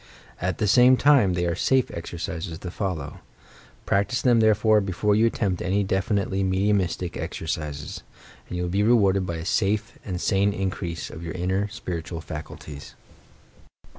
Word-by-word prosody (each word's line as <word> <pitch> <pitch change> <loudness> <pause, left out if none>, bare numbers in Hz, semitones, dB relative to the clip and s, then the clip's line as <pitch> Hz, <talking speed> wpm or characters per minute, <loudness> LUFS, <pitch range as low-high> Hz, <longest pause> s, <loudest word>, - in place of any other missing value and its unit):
At 90 +1 -1
the 105 - 0
same 125 +5 +6
time, 135 -11 +5
they 90 0 0
are 85 - 0
safe 130 +7 +1
exercises 85 0 -5
to 90 +1 -7
follow. 90 -8 -4 0.7
Practise 100 +6 +1
them, 120 -2 +4
therefore, 110 0 +4
before 100 +2 0
you 110 +3 +4
attempt 100 -5 -1
any 100 +3 +1
definitely 95 0 0
mediumistic 95 -2 0
exercises; 75 -2 -4 0.5
and 90 - -4
you 90 - -1
will 90 - -2
be 100 +2 +1
rewarded 100 -4 +3
by 85 - -3
a 80 0 -6
safe 105 +4 0
and 90 -3 -4
sane 100 +1 +2
increase 95 -4 -3
of 80 - -9
your 85 - -5
inner, 95 +3 0
spiritual 85 -6 -5
faculties. 75 -2 -9
95 Hz, 155 wpm, -25 LUFS, 85-105 Hz, 0.7 s, same